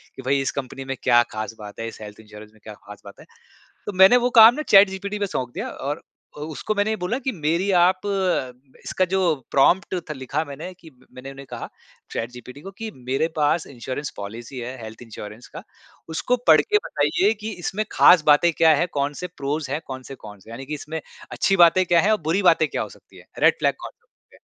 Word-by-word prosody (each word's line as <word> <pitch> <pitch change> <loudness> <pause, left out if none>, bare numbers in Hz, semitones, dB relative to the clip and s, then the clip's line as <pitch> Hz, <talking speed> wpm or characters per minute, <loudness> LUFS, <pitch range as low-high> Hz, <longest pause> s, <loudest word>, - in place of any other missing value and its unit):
कि - - -8
भई 140 +1 +2
इस 135 - -1
कंपनी 135 0 -8
में 135 0 -4
क्या 120 -2 +5
ख़ास 110 +1 -5
बात 105 -1 -10
है, 115 - -4
इस 115 - -10
हेल्थ 105 0 -10
इंश्योरेंस 105 0 -13
में 110 - -23
क्या 110 - -9
ख़ास 105 0 -14
बात 100 - -13
है? - - -14 0.6
तो - - -3
मैंने 190 +6 +8
वो 245 0 +1
काम 225 +2 +9
न - - -2
चैटजीपीटी 200 +1 +4
पे 200 - -1
सौंप 125 -9 -4
दिया - - -4
और 145 +4 -5 0.4
उसको 155 +7 -4
मैंने 205 +1 +1
ये - - 0
बोला 180 +7 -1
कि 265 -1 -2
मेरी 170 +3 -1
आप 185 +1 +3 0.8
इसका 185 - 0
जो 190 - +2 0.3
प्रॉम्प्ट 175 +8 +3
थ - - -2
लिखा 130 +3 -3
मैंने 150 +6 -8
कि 165 - -14 0.2
मैंने 130 +2 -9
उन्हें 135 0 -11
कहा - - -7 0.4
चैटजीपीटी 125 +3 -7
को 195 - -9
कि 225 0 -4
मेरे 130 +5 -1
पास 150 +2 +1
इंश्योरेंस 130 +3 -6
पॉलिसी 115 +6 -8
है 125 +2 -6
हेल्थ 110 +1 -10
इंश्योरेंस 110 0 -10
का। - - -6 0.5
उसको 245 +10 0
पढ़ - - +7
के 420 -1 +1
बताइए 365 - +1
कि 220 +1 -4
इसमें 195 +4 -2
ख़ास 175 -4 +6
बातें 150 +4 +5
क्या 160 -1 +6
है, 170 - +1
कौन-से 145 +3 -3
प्रोज़ 140 0 -3
है, 145 - -1
कौन-से 130 0 -8
कॉन्स 105 -5 -13
हैं? - - -11
यानि 130 +3 -8
कि 150 - -6
इसमें 150 +2 -5 0.3
अच्छी 195 - +1
बातें 175 +2 +5
क्या 170 -1 +4
हैं 210 - +2
और 215 - +1
बुरी 165 +6 0
बातें 165 -3 +4
क्या - - -3
हो - - -5
सकती - - -18
हैं? - - -16
रेड - - +4
फ्लैग - - +1
कौन-कौन - - -12 0.2
से - - -19
हैं। - - -31
145 Hz, 220 wpm, -22 LUFS, 125-185 Hz, 0.8 s, काम